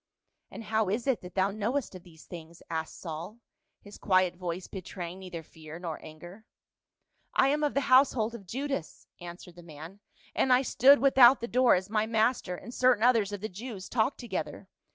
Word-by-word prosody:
"And -, -, -9 dB
how 220 Hz, -2 st, 0 dB
is 220 Hz, +4 st, -2 dB
it 265 Hz, -4 st, 0 dB
that 180 Hz, 0 st, -11 dB
thou 195 Hz, +1 st, +1 dB
knowest 225 Hz, +6 st, -2 dB
of 185 Hz, -, -10 dB
these 165 Hz, -2 st, -17 dB
things?" 170 Hz, -1 st, -11 dB
asked 160 Hz, -1 st, -4 dB
Saul, 170 Hz, +5 st, -7 dB, 0.4 s
his 205 Hz, 0 st, -13 dB
quiet 185 Hz, -2 st, +2 dB
voice 180 Hz, 0 st, -5 dB
betraying 180 Hz, -1 st, -7 dB
neither 180 Hz, -3 st, -8 dB
fear 155 Hz, 0 st, -12 dB
nor 170 Hz, -3 st, -6 dB
anger. 175 Hz, +7 st, -12 dB, 0.4 s
" -, -, -48 dB
I 270 Hz, -, +3 dB
am 300 Hz, +2 st, 0 dB
of 295 Hz, -, 0 dB
the 280 Hz, -, +2 dB
household 255 Hz, -4 st, +3 dB
of 205 Hz, -5 st, -10 dB
Judas," 270 Hz, -, -5 dB
answered 175 Hz, 0 st, -11 dB
the -, -, -11 dB
man, 165 Hz, +4 st, -11 dB, 0.2 s
" -, -, -30 dB
and 260 Hz, -, +1 dB
I 250 Hz, +1 st, +5 dB
stood 275 Hz, +2 st, +5 dB
without 265 Hz, -2 st, +6 dB
the 235 Hz, -, -4 dB
door 250 Hz, 0 st, +4 dB
as 185 Hz, +1 st, -3 dB
my 215 Hz, 0 st, 0 dB
master 220 Hz, -4 st, 0 dB
and 230 Hz, +7 st, -10 dB
certain 250 Hz, -4 st, +3 dB
others 230 Hz, -5 st, +3 dB
of 205 Hz, -2 st, -6 dB
the 215 Hz, -, -3 dB
Jews 205 Hz, -1 st, -8 dB
talked 235 Hz, +3 st, 0 dB
together. 190 Hz, -, -5 dB
200 Hz, 195 wpm, -29 LUFS, 175-240 Hz, 0.4 s, without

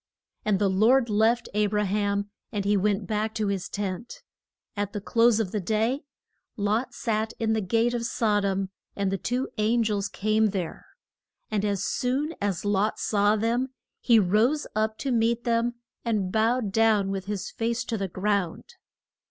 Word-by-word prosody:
And 210 Hz, -2 st, +2 dB
the 200 Hz, 0 st, +2 dB
Lord 225 Hz, +5 st, +3 dB
left 225 Hz, +3 st, +2 dB
A 210 Hz, 0 st, +2 dB
bra 210 Hz, +1 st, 0 dB
ham 200 Hz, 0 st, -1 dB, 0.2 s
and 200 Hz, -2 st, -2 dB
he 205 Hz, +1 st, +3 dB
went 200 Hz, 0 st, +1 dB
back 215 Hz, 0 st, -2 dB
to 215 Hz, -2 st, 0 dB
his 195 Hz, -2 st, -2 dB
tent. 200 Hz, +2 st, -5 dB, 0.5 s
At 205 Hz, 0 st, -2 dB
the 205 Hz, -, -2 dB
close 230 Hz, +2 st, +3 dB
of 205 Hz, -5 st, -1 dB
the 210 Hz, -, -1 dB
day, 225 Hz, -, 0 dB, 0.5 s
Lot 210 Hz, +4 st, 0 dB
sat 220 Hz, -1 st, -1 dB
in 220 Hz, -1 st, +1 dB
the 220 Hz, -, +1 dB
gate 230 Hz, +5 st, +1 dB
of 235 Hz, -1 st, -1 dB
Sod 210 Hz, -4 st, +1 dB
om 195 Hz, -1 st, -1 dB, 0.2 s
and 195 Hz, -1 st, -1 dB
two 250 Hz, +2 st, -1 dB
an 230 Hz, +2 st, +3 dB
gels 205 Hz, -2 st, -1 dB
came 215 Hz, +1 st, +2 dB
there. 185 Hz, -4 st, -4 dB, 0.6 s
And 210 Hz, -2 st, 0 dB
as 200 Hz, -2 st, 0 dB
soon 275 Hz, +6 st, -1 dB
as 200 Hz, -2 st, -1 dB
Lot 205 Hz, +1 st, +1 dB
saw 205 Hz, 0 st, +2 dB
them 240 Hz, +4 st, -1 dB, 0.2 s
he 235 Hz, -2 st, +4 dB
rose 220 Hz, +9 st, +3 dB
up 215 Hz, 0 st, 0 dB
to 275 Hz, -, -2 dB
meet 235 Hz, 0 st, +1 dB
them 235 Hz, 0 st, +1 dB, 0.3 s
and 210 Hz, -6 st, 0 dB
bowed 220 Hz, 0 st, +1 dB
down 215 Hz, -2 st, +3 dB
with 195 Hz, -1 st, -3 dB
his 200 Hz, -1 st, -4 dB
face 235 Hz, +1 st, -1 dB
to 230 Hz, -, -2 dB
the 195 Hz, -2 st, -2 dB
ground. 190 Hz, -1 st, -2 dB
215 Hz, 175 wpm, -26 LUFS, 200-230 Hz, 0.6 s, he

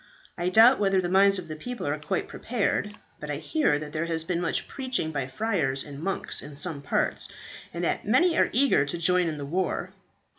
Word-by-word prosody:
I 175 Hz, +1 st, -1 dB
doubt 225 Hz, +7 st, +6 dB
whether 195 Hz, -2 st, +2 dB
the 175 Hz, -1 st, -1 dB
minds 195 Hz, +1 st, +5 dB
of 180 Hz, -3 st, -6 dB
the 155 Hz, -, -6 dB
people 245 Hz, +10 st, -6 dB
are 145 Hz, +1 st, -1 dB
quite 180 Hz, +5 st, -2 dB
prepared, 210 Hz, -2 st, -2 dB, 0.2 s
but -, -, -7 dB
I -, -, -1 dB
hear 300 Hz, -, +1 dB
that 150 Hz, 0 st, -8 dB
there 160 Hz, +1 st, -2 dB
has 165 Hz, -1 st, 0 dB
been 170 Hz, +1 st, -2 dB
much 170 Hz, -, -1 dB
preaching 255 Hz, -, -2 dB
by 140 Hz, -4 st, -3 dB
friars 135 Hz, -5 st, -1 dB
and 145 Hz, -1 st, -9 dB
monks 195 Hz, +3 st, 0 dB
in 145 Hz, -, -10 dB
some 155 Hz, -2 st, -2 dB
parts, 140 Hz, -, 0 dB, 0.4 s
and 170 Hz, +2 st, -5 dB
that -, -, 0 dB
many 325 Hz, -, +3 dB
are -, -, +3 dB
eager 265 Hz, -, +3 dB
to 145 Hz, +4 st, -3 dB
join 180 Hz, +1 st, +3 dB
in 155 Hz, -2 st, -3 dB
the 145 Hz, -, -5 dB
war." 180 Hz, +6 st, -2 dB
175 Hz, 215 wpm, -26 LUFS, 155-205 Hz, 0.4 s, doubt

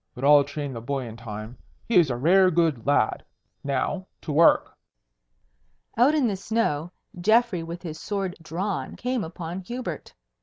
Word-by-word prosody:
"But 125 Hz, -, -8 dB
I'll 145 Hz, 0 st, +7 dB
train 145 Hz, -1 st, -5 dB
the 115 Hz, -, -6 dB
boy 135 Hz, +2 st, -3 dB
in 115 Hz, -1 st, -8 dB
time. 110 Hz, +1 st, -8 dB, 0.3 s
He 230 Hz, -, +3 dB
is 165 Hz, -5 st, +5 dB
a 120 Hz, -, -1 dB
rare 185 Hz, +8 st, +5 dB
good 160 Hz, -8 st, +1 dB
lad. 125 Hz, -6 st, +2 dB, 0.4 s
Now, 140 Hz, +7 st, -2 dB
to 155 Hz, -, -5 dB
work." 160 Hz, +3 st, +4 dB, 1.2 s
Out 255 Hz, +7 st, +4 dB
in 295 Hz, -4 st, +2 dB
the 205 Hz, -, -1 dB
snow, 185 Hz, -6 st, -1 dB, 0.3 s
Geoffrey 220 Hz, -1 st, +3 dB
with 170 Hz, +2 st, -7 dB
his 160 Hz, -3 st, -6 dB
sword 195 Hz, -3 st, -3 dB
drawn 180 Hz, +5 st, -3 dB
came 250 Hz, -2 st, -2 dB
upon 165 Hz, +2 st, -6 dB
Hubert. 190 Hz, -, -6 dB
165 Hz, 160 wpm, -25 LUFS, 140-195 Hz, 1.2 s, I'll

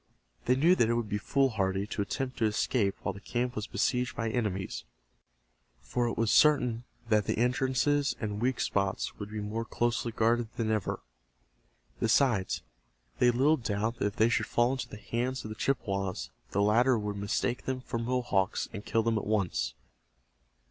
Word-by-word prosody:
They 125 Hz, -, +4 dB
knew 160 Hz, +7 st, +5 dB
that 115 Hz, -, +3 dB
it 115 Hz, -, +2 dB
would 115 Hz, -3 st, -2 dB
be 105 Hz, -, -1 dB
foolhardy 100 Hz, -7 st, +1 dB
to 105 Hz, 0 st, -3 dB
attempt 130 Hz, +6 st, -3 dB
to 115 Hz, -, +3 dB
escape 105 Hz, -1 st, +1 dB
while 100 Hz, -, -1 dB
the 100 Hz, -, -10 dB
camp 125 Hz, +2 st, -2 dB
was 105 Hz, -, -3 dB
besieged 125 Hz, -1 st, 0 dB
by 115 Hz, -1 st, -2 dB
enemies, 95 Hz, -, -2 dB, 1.0 s
for 120 Hz, -, -1 dB
it 115 Hz, -, -3 dB
was 115 Hz, -1 st, +2 dB
certain 125 Hz, -6 st, +4 dB, 0.2 s
that 105 Hz, -2 st, +3 dB
the -, -, 0 dB
entrances 130 Hz, +3 st, +1 dB
and 105 Hz, -1 st, -3 dB
weak 125 Hz, 0 st, +1 dB
spots 100 Hz, -1 st, -1 dB
would 105 Hz, -1 st, -6 dB
be 110 Hz, 0 st, -5 dB
more 105 Hz, +2 st, -3 dB
closely 120 Hz, +1 st, -1 dB
guarded 115 Hz, +1 st, +2 dB
than 110 Hz, -2 st, -1 dB
ever. 110 Hz, -4 st, -1 dB, 1.0 s
Besides, 115 Hz, -, +2 dB, 0.6 s
they -, -, +5 dB
had 120 Hz, -, +3 dB
little 145 Hz, +5 st, +4 dB
doubt 110 Hz, 0 st, -2 dB
that -, -, +1 dB
if 100 Hz, -, -5 dB
they 115 Hz, -1 st, +4 dB
should 130 Hz, -, +1 dB
fall 120 Hz, +1 st, +2 dB
into 130 Hz, -2 st, -3 dB
the 105 Hz, -, -8 dB
hands 125 Hz, +4 st, -2 dB
of -, -, -5 dB
the 110 Hz, -, -6 dB
Chippewas 95 Hz, -, -2 dB, 0.2 s
the 100 Hz, -, +1 dB
latter 120 Hz, +4 st, +4 dB
would 105 Hz, -1 st, -3 dB
mistake 120 Hz, +4 st, -1 dB
them 130 Hz, -1 st, -2 dB
for 120 Hz, -2 st, -4 dB
Mohawks, 120 Hz, -5 st, 0 dB
and 105 Hz, -2 st, -6 dB
kill 115 Hz, +1 st, +1 dB
them 115 Hz, -1 st, +1 dB
at -, -, -7 dB
once. 85 Hz, -, 0 dB
115 Hz, 185 wpm, -30 LUFS, 105-125 Hz, 1.0 s, knew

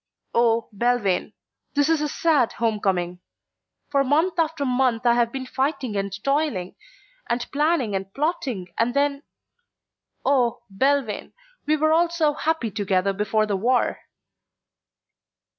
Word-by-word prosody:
"Oh, 230 Hz, -1 st, +2 dB
Belvane, 235 Hz, -4 st, +1 dB, 0.4 s
this 285 Hz, 0 st, +3 dB
is 325 Hz, -2 st, +2 dB
a 300 Hz, -, 0 dB
sad 290 Hz, -6 st, +2 dB
homecoming. 195 Hz, -6 st, -1 dB, 0.7 s
For 280 Hz, -1 st, +3 dB
month 325 Hz, +6 st, +1 dB
after 320 Hz, -3 st, 0 dB
month 250 Hz, -2 st, +1 dB
I 240 Hz, -, +6 dB
have 235 Hz, -1 st, +2 dB
been 265 Hz, 0 st, -5 dB
fighting 260 Hz, -3 st, -2 dB
and 200 Hz, 0 st, -2 dB
toiling, 275 Hz, -, 0 dB, 0.6 s
and 240 Hz, +1 st, 0 dB
planning 295 Hz, -6 st, +1 dB
and 195 Hz, 0 st, -4 dB
plotting 265 Hz, -, -2 dB
and 240 Hz, +3 st, +1 dB
then 280 Hz, 0 st, +1 dB, 1.0 s
Oh, 245 Hz, -4 st, +2 dB
Belvane, 260 Hz, 0 st, 0 dB, 0.3 s
we 310 Hz, +1 st, +3 dB
were 310 Hz, +1 st, +2 dB
all 335 Hz, +1 st, +3 dB
so 320 Hz, -3 st, +1 dB
happy 310 Hz, -7 st, -1 dB
together 195 Hz, -1 st, 0 dB
before 210 Hz, +2 st, +1 dB
the 205 Hz, -2 st, -1 dB
war." 240 Hz, +6 st, +1 dB
250 Hz, 130 wpm, -24 LUFS, 215-290 Hz, 1.0 s, I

